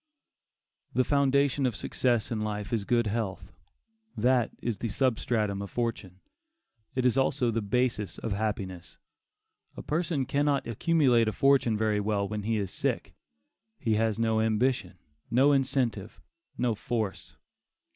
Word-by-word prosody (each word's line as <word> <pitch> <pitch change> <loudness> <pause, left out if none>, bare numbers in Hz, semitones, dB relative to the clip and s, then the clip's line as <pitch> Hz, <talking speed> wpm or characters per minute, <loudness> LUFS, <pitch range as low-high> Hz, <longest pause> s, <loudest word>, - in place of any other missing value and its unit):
'" - - -46
The 130 - +4
foundation 140 0 +2
of 120 - -2
success 120 +1 0
in 110 -2 -1
life 105 +2 -3
is 110 -3 0
good 120 0 +2
health; 100 -3 -3 0.7
that 120 +1 +3
is 115 -4 -3
the 115 - -2
substratum 110 -4 0
of 100 - -6
fortune; 110 -6 -3 0.7
it 130 -1 0
is 125 +1 +3
also 130 -2 +1
the 115 0 -1
basis 110 -1 -1
of 110 - -3
happiness. 100 -4 -4 0.8
A - - -6
person 155 -3 -1
cannot 140 +1 +1
accumulate 125 -1 +3
a - - +2
fortune 135 -4 +3
very 105 -1 +1
well 100 -1 0
when 105 +1 -4
he 110 +2 0
is 100 -3 -3
sick. - - -2 0.6
He 115 -3 0
has 110 0 +1
no 110 -1 +1
ambition; 110 -2 0 0.3
no 135 +5 +4
incentive; 130 -6 0 0.4
no 120 -2 +1
force. 110 -1 -4
115 Hz, 145 wpm, -28 LUFS, 105-130 Hz, 0.8 s, The